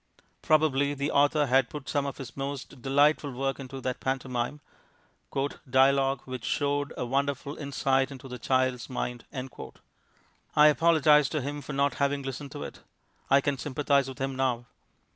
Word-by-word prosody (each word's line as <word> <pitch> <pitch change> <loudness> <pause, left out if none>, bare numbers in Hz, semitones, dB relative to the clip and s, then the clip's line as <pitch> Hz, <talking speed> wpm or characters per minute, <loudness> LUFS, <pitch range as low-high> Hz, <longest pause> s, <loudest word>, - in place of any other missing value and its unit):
Probably 145 -2 +2
the 140 +1 -2
author 145 +1 +3
had 130 -2 +3
put 145 -3 -8
some 140 -1 0
of 140 - -5
his 125 -4 -8
most 135 -2 -5
delightful 145 +2 +3
work 135 +2 -2
into 135 0 -7
that 130 -1 -3
pantomime 130 +1 -2 1.1
"dialogue 135 0 +3
which 130 -2 -6
showed 145 -1 0
a - - -2
wonderful 140 +2 -1
insight 135 -2 0
into 135 -1 -10
the 125 -1 -7
child's 130 -1 0
mind"; 125 -2 -4 1.3
I 150 0 +8
apologize 150 -2 +4
to 155 - -1
him 145 +2 -4
for 145 - -7
not 140 +1 +2
having 140 0 +1
listened 135 +1 -6
to 145 - -6
it. - - -8 0.5
(I 140 +1 +6
can 140 -1 -1
sympathize 140 -1 +1
with 130 - -8
him 135 0 -2
now.) 125 -2 0
135 Hz, 160 wpm, -28 LUFS, 130-145 Hz, 1.3 s, I